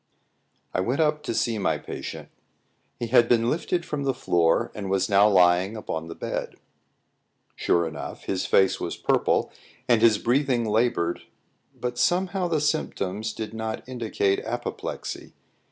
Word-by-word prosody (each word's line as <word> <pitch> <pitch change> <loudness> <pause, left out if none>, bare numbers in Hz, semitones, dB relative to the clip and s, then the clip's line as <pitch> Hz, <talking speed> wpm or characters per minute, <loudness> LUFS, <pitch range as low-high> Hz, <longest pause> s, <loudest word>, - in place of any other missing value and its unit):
I - - 0
went 120 - 0
up 150 -1 +2
to 150 - -3
see 115 -2 0
my 80 -5 +1
patient. - - -7 0.7
He 120 - -2
had 120 0 +4
been 115 0 +3
lifted 170 +1 -1
from 150 -2 -3
the 135 -2 0
floor, 85 -10 +2
and 100 -2 -5
was 95 0 +1
now 100 +2 +6
lying 90 +2 +4
upon 80 -6 -4
the 85 - -8
bed. - - -4 1.0
Sure 85 -1 +1
enough, 80 -2 -7
his 95 -1 -2
face 95 -1 +3
was - - -4
purple - - +1 0.4
and 120 -3 +4
his 115 -2 +6
breathing 125 0 +1
laboured, 110 -6 +1 0.6
but 125 0 -3
somehow 180 +5 +1
the 165 -3 +1
symptoms 110 - -1
did 110 0 -6
not 110 +1 -4
indicate 110 -6 0
apoplexy. - - -5
110 Hz, 150 wpm, -25 LUFS, 95-130 Hz, 1.0 s, now